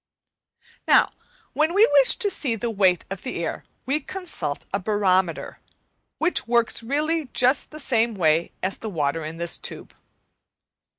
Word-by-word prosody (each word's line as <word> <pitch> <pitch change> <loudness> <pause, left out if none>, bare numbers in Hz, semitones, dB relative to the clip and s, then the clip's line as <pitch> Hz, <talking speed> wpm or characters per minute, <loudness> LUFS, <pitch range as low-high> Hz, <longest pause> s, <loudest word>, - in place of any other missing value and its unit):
Now - - +5 0.4
when 315 +4 +1
we 420 +2 +7
wish 285 - +4
to 415 -4 0
see 255 -10 -1
the 230 +1 -3
weight 190 -4 +2
of 195 - -5
the 170 - -4
air - - -5 0.2
we 275 +4 +1
consult 325 - -5
a 200 - +1
barometer, 190 -4 0 0.6
which 340 -5 0
works 235 -1 +1
really 300 +5 -1
just 255 +2 +3
in - - -15
the - - -9
same 230 -5 +1
way 165 -2 +2
as 190 +1 -2
the 220 - -5
water 155 -3 -1
in 155 +2 -6
this 170 0 -2
tube. - - -6
225 Hz, 160 wpm, -24 LUFS, 180-290 Hz, 0.6 s, we